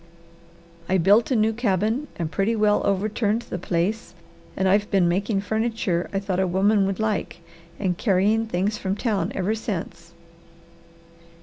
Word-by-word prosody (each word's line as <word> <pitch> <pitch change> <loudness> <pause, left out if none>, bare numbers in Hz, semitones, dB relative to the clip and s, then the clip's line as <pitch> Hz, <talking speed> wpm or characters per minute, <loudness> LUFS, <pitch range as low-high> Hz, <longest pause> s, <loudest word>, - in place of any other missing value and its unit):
"I 190 - +3
built 200 +6 +4
a 260 - +1
new 220 0 +2
cabin 220 +4 0
and 165 -2 -4
pretty 200 +5 0
well 210 -1 +2
overturned 210 +3 0
the 180 - -6
place 180 +5 -2 0.4
and 190 - +1
I've 205 +2 +2
been 190 -3 +3
making 195 +3 0
furniture 220 -4 -1
I 195 - -2
thought 195 -2 -2
a 190 - +2
woman 195 +2 +2
would 195 -1 -3
like, 220 -2 -2 0.4
and 185 -3 -1
carrying 215 +2 +2
things 205 +2 -1
from 190 0 -2
town 210 -2 -1
ever 195 +3 0
since." 170 -6 -5
200 Hz, 150 wpm, -24 LUFS, 185-220 Hz, 0.4 s, built